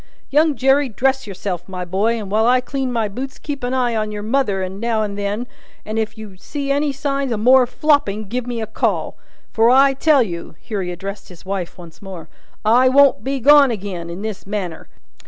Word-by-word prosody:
Young 300 +1 +3
Jerry, 270 +1 +3
dress 265 +2 0
yourself, 190 -2 -5
my 180 -1 -5
boy, 205 +6 0
and 205 -3 -6
while 220 +2 +3
I 250 +1 +5
clean 265 0 -3
my 230 -3 0
boots 260 +6 -6
keep 285 -3 -6
a - - 0
eye 250 -1 0
upon 215 -2 -2
your 210 0 -5
mother 210 -6 0
now 220 +3 -1
and 205 -1 -4
then, 205 +3 -2 0.4
and 215 +1 -2
if 220 0 -3
you 210 -4 -10
see 275 +8 -4
any 285 +1 +1
signs 275 -1 -2
of 220 - -1
more 250 +3 +5
flopping, 265 -8 +1
give 245 +3 -3
me 240 -1 -3
a - - -2
call. 220 - -1 0.4
For, 225 +1 +3
I 270 +2 +5
tell 280 -1 +4
you," 170 -5 -7
here 210 -3 -4
he 180 - -4
addressed 195 +3 -7
his 180 0 -15
wife 190 -2 -4
once 170 -2 -13
more, 190 -5 -9 0.4
"I 245 +4 +5
won't 275 -5 +4
be 270 +2 -2
gone 285 0 +6
agin, 190 -5 -5
in 175 +4 -7
this 210 -3 -6
manner. 190 -6 -4
225 Hz, 210 wpm, -19 LUFS, 200-265 Hz, 0.4 s, gone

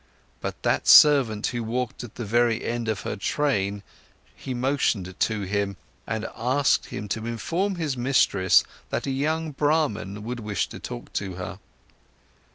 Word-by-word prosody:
But - - -6
that - - +1
servant 130 -8 +7
who 120 -1 -2
walked 120 +2 -3
at 115 -2 -10
the 120 - -5
very 115 +1 +2
end 120 -1 -2
of 110 -2 -1
her - - -3
train 100 -3 -1 0.5
he 130 - -7
motioned 120 -8 0
to 110 -2 +1
him 100 0 -2 0.3
and 110 0 -2
asked 130 +4 +1
him 105 - -6
to 110 +3 -3
inform 170 - -1
his 155 -6 -2
mistress 120 -7 +3 0.3
that - - -2
a 135 - -1
young 155 +4 -1
Brahman 135 -9 0
would 120 +2 -4
wish 105 -2 -2
to - - -9
talk - - -8
to 95 -3 -3
her. 90 +1 -6
115 Hz, 160 wpm, -25 LUFS, 100-135 Hz, 0.5 s, servant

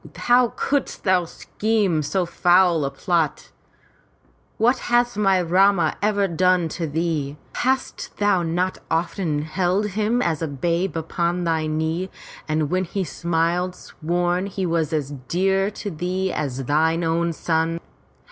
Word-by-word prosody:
How 245 0 +4
couldst 285 -2 -1
thou 185 -2 +3
scheme 205 -2 -1
so 180 +5 0
foul 175 -2 +3
a - - 0
plot? 155 +2 -1 1.1
What 245 +4 +3
has 240 -1 +3
my 195 -2 +3
Rama 190 +2 +3
ever 205 -1 +2
done 180 -1 +2
to 165 +1 -3
thee? 150 -2 -2 0.2
Hast 260 +1 -2
thou 205 -3 +2
not 175 +3 -1
often 165 -2 -1
held 185 +5 0
him 215 +4 0
as 165 -9 0
a 165 - -1
babe 170 +6 -1
upon 170 +2 -1
thy 160 -2 0
knee 160 +4 -1 0.4
and 155 -1 0
when 185 +1 +1
he 195 +3 -2
smiled, 170 +3 -1
sworn 175 +3 -2
he 195 -1 -3
was 165 -3 0 0.4
dear 195 +4 +1
to 210 -1 -6
thee 180 +3 -2
as 135 -3 -3
thine 160 +4 +2
own 165 +1 +1
son? 165 0 -1
175 Hz, 140 wpm, -22 LUFS, 160-195 Hz, 1.1 s, How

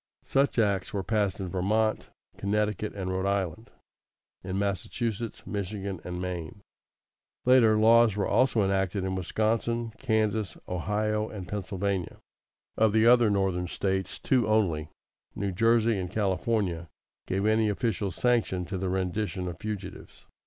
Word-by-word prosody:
Such 135 -1 +1
acts 100 -4 +1
were 100 -2 -1
passed 100 -1 0
in 95 -2 -4
Vermont, 110 +5 0 0.3
Connecticut, 105 +1 -1
and 95 -2 -3
Rhode 95 +1 -1
Island, 100 +1 -2 0.7
in 95 +1 -3
Massachusetts, 110 +3 -3
Michigan, 100 -2 -4
and 90 0 -5
Maine. 90 0 -5 0.8
Later, 120 -4 +6
laws 115 -1 +5
were 100 - 0
also 120 -5 +3
enacted 95 0 0
in 95 0 -2
Wisconsin, 115 +4 -1
Kansas, 110 -5 0
Ohio, 105 +4 -1
and 95 -4 -7
Pennsylvania. 95 -1 -3 0.6
Of 110 -2 +3
the 110 0 +4
other 120 -2 +6
Northern 95 -3 0
States, 95 +1 -2
two 125 -6 +1
only, 90 -8 +1 0.5
New 100 0 -2
Jersey 115 +2 +3
and 90 -1 -3
California, 95 -4 -1 0.4
gave 95 +2 -1
any 110 0 +3
official 105 -2 -1
sanction 110 -4 +1
to 95 +2 -4
the 95 0 -1
rendition 95 0 -2
of 85 -2 -6
fugitives. 100 -3 -7
100 Hz, 135 wpm, -28 LUFS, 95-110 Hz, 0.8 s, Later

